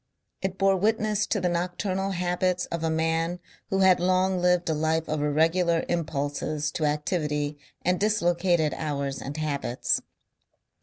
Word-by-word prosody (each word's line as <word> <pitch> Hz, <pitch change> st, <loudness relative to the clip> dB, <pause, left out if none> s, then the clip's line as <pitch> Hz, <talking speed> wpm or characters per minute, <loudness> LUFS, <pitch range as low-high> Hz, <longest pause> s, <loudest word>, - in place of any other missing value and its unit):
It 190 Hz, 0 st, -2 dB
bore 195 Hz, -1 st, +3 dB
witness 215 Hz, +1 st, +1 dB
to 210 Hz, -, 0 dB
the 180 Hz, -, 0 dB
nocturnal 185 Hz, +2 st, -1 dB
habits 180 Hz, 0 st, 0 dB
of 170 Hz, -1 st, -3 dB
a 160 Hz, -, +1 dB
man 165 Hz, +2 st, 0 dB, 0.3 s
who 195 Hz, 0 st, +1 dB
had 185 Hz, -1 st, +6 dB
long 185 Hz, +1 st, +2 dB
lived 180 Hz, -1 st, +2 dB
a 160 Hz, -, +2 dB
life 160 Hz, +1 st, 0 dB
of 155 Hz, -1 st, -1 dB
irregular 165 Hz, +3 st, +2 dB
impulses 150 Hz, -2 st, -2 dB
to 155 Hz, -, -1 dB
activity 150 Hz, -1 st, -1 dB, 0.2 s
and 180 Hz, 0 st, +1 dB
dislocated 175 Hz, -6 st, +2 dB
hours 140 Hz, -3 st, -3 dB
and 140 Hz, +3 st, -6 dB
habits. 140 Hz, -5 st, -1 dB
170 Hz, 145 wpm, -26 LUFS, 155-185 Hz, 0.3 s, had